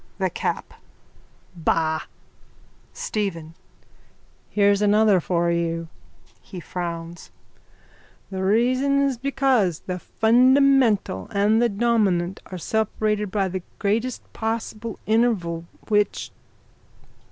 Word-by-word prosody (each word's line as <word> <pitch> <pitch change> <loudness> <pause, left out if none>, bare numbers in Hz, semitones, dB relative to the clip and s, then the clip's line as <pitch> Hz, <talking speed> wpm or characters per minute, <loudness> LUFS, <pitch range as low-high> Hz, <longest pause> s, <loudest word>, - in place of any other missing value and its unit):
THE - - 0
CAP: - - -3 0.8
Bah! 160 -1 +1 0.9
STEPHEN: 170 -7 -4 1.0
Here's 200 -1 +3
another 210 -1 +4
for 170 0 0
you. 165 -1 -2 0.5
(He 185 - -9
frowns.) 170 0 -6 1.0
The 190 0 -3
reason 255 +7 +2
is 270 -4 0
because 265 - +1
the 180 -1 -5
fundamental 245 - +3
and 210 +3 +3
the 240 - +3
dominant 200 -5 +1
are 185 - -7
separated 210 +1 -1
by 195 0 0
the 185 0 -4 0.2
greatest 225 +5 -1
possible 225 0 -4
interval 205 -8 +1 0.2
which... 210 -1 0
205 Hz, 95 wpm, -23 LUFS, 175-230 Hz, 1.0 s, another